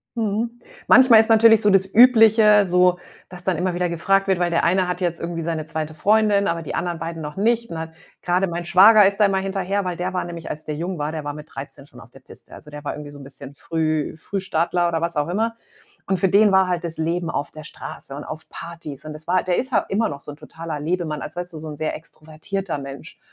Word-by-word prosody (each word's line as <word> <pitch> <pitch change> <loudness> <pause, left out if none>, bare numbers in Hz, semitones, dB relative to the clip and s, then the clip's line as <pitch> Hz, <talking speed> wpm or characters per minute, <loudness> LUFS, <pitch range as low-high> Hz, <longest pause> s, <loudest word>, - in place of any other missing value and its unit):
Mhm. 230 +2 -2 0.3
Manchmal 245 -4 +7
ist 225 - -3
natürlich 225 0 +6
so 210 - +3
das 195 -1 +4
Übliche 220 -2 +6
so, 180 0 +3 0.3
dass 180 0 -12
dann 185 -3 +1
immer 180 0 -1
wieder 180 0 -1
gefragt 195 +4 +1
wird, 190 -2 +1
weil 175 -1 0
der 170 - +1
eine 180 +1 +2
hat 180 +1 -3
jetzt 175 -2 -2
irgendwie 170 0 -4
seine 160 -1 -3
2. 155 -1 -5
Freundin, 205 +3 +2
aber 170 0 -2
die - - -5
anderen 170 -1 -3
beiden 165 0 -5
noch 150 +3 -7
nicht 230 +1 +1
und 165 - -6
da 160 - -4
hat 160 - -10 0.3
grade 180 +2 +1
mein 170 0 -5
Schwager 200 +3 +7
ist 200 +2 -2
da - - +7
immer 195 -1 +1
hinterher, 195 0 -2
weil 180 -1 -2
der 180 +2 -3
war 180 - -2
nämlich, 170 -1 -8
als 155 +1 -6
der 150 - -4
jung 175 +3 -4
war 150 +2 -3
der 155 -2 -5
war 145 0 -4
mit 150 +1 -10
13 140 0 -10
schon 125 - -15
auf 120 - -17
der 135 - -16
Piste. - - -15
Also 150 - -12
der 150 0 -9
war - - -3
irgendwie 150 -1 -9
so 145 - -12
'n - - -11
bisschen 140 +1 -11
Früh 155 -1 -2
Frühstarter 175 -1 -1
oder 165 -1 -1
was 170 0 -3
auch 150 +3 -1
immer. 225 +5 -1 0.5
Und 190 -2 0
für 190 - +3
den 205 +1 +5
war 190 -1 +4
halt 180 -1 -2
das 165 -1 -5
Leben 170 +1 -2
auf 145 - -3
der 155 0 -11
Straße 135 - -9
und 145 - -7
auf 155 0 -9
Partys 165 -4 -9
und 155 - -7
das 155 +1 -12
war 185 +1 +2
der 180 -1 0
ist 260 +1 -4
ja - - +4
immer 220 +3 0
noch 140 -1 -7
so 145 - -9
'n - - -10
totaler 160 0 -7
Lebemann, 160 -2 -2
also 155 +4 -7
weißt 175 -1 -6
du, - - -8
so 155 0 -7
'n 150 - -8
sehr 155 0 -2
extrovertierter 160 +2 -6
Mensch 135 -1 -10
175 Hz, 260 wpm, -21 LUFS, 155-195 Hz, 0.5 s, Manchmal